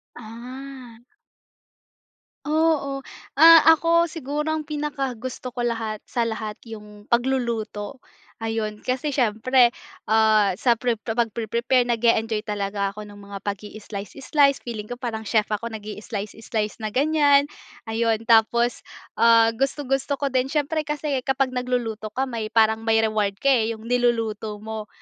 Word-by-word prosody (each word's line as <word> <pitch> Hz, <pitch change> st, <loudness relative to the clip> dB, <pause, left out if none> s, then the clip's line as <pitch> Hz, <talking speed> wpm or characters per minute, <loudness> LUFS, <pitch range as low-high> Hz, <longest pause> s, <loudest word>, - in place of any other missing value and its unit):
Ah. 245 Hz, +1 st, -10 dB, 1.5 s
Oo. 300 Hz, -3 st, +1 dB, 0.3 s
Ah, 330 Hz, +3 st, +9 dB, 0.2 s
ako, 335 Hz, +1 st, +2 dB
siguro, 300 Hz, -1 st, -4 dB
ang 315 Hz, 0 st, -1 dB
pinakagusto 275 Hz, -5 st, -4 dB
ko 245 Hz, -, -9 dB
lahat 225 Hz, -3 st, -2 dB
sa 240 Hz, -2 st, -1 dB
lahat, 220 Hz, -2 st, -4 dB
yung 210 Hz, -2 st, -11 dB
pagluluto. 235 Hz, -3 st, -1 dB, 0.4 s
Ayun, 225 Hz, -2 st, -3 dB
kasi 255 Hz, +5 st, -2 dB
siyempre, 245 Hz, 0 st, +3 dB, 0.4 s
ah, 215 Hz, -3 st, +4 dB
sa 235 Hz, +3 st, +2 dB
pre 240 Hz, -2 st, 0 dB
pagpre-prepare 235 Hz, +2 st, 0 dB
nag-e-enjoy 230 Hz, -2 st, +1 dB
talaga 200 Hz, -1 st, -2 dB
ako 210 Hz, -, -7 dB
ng 205 Hz, -1 st, -12 dB
mga 200 Hz, -1 st, -9 dB
pag-i-slice, 205 Hz, 0 st, -6 dB
slice. 280 Hz, -1 st, +3 dB
Feeling 220 Hz, -3 st, -6 dB
ko 245 Hz, -, -5 dB
parang 225 Hz, -3 st, -5 dB
chef 215 Hz, -1 st, +1 dB
ako 215 Hz, +2 st, -2 dB
nag-i 215 Hz, -2 st, -7 dB
slice, 210 Hz, -1 st, -5 dB
slice 215 Hz, -1 st, -3 dB
na 215 Hz, -, -3 dB
ganyan, 285 Hz, +3 st, +3 dB, 0.4 s
ayun. 225 Hz, 0 st, 0 dB
Tapos, 235 Hz, +1 st, +3 dB, 0.4 s
ah, 230 Hz, -1 st, +6 dB
gustong-gusto 270 Hz, +2 st, -1 dB
ko 280 Hz, 0 st, -2 dB
din 255 Hz, 0 st, +1 dB
siyempre 300 Hz, +2 st, -1 dB
kasi 295 Hz, -2 st, -1 dB
kapag 270 Hz, -1 st, +1 dB
nagluluto 245 Hz, -4 st, -2 dB
ka 265 Hz, -, +1 dB
may 230 Hz, -5 st, -3 dB
parang 220 Hz, 0 st, +3 dB
may 225 Hz, 0 st, +4 dB
reward 210 Hz, -2 st, 0 dB
ka, 275 Hz, -, +5 dB
eh, 230 Hz, -3 st, +2 dB
yung 220 Hz, -, -14 dB
niluluto 230 Hz, -3 st, 0 dB
mo. 220 Hz, -1 st, -6 dB
235 Hz, 135 wpm, -23 LUFS, 220-265 Hz, 1.5 s, Ah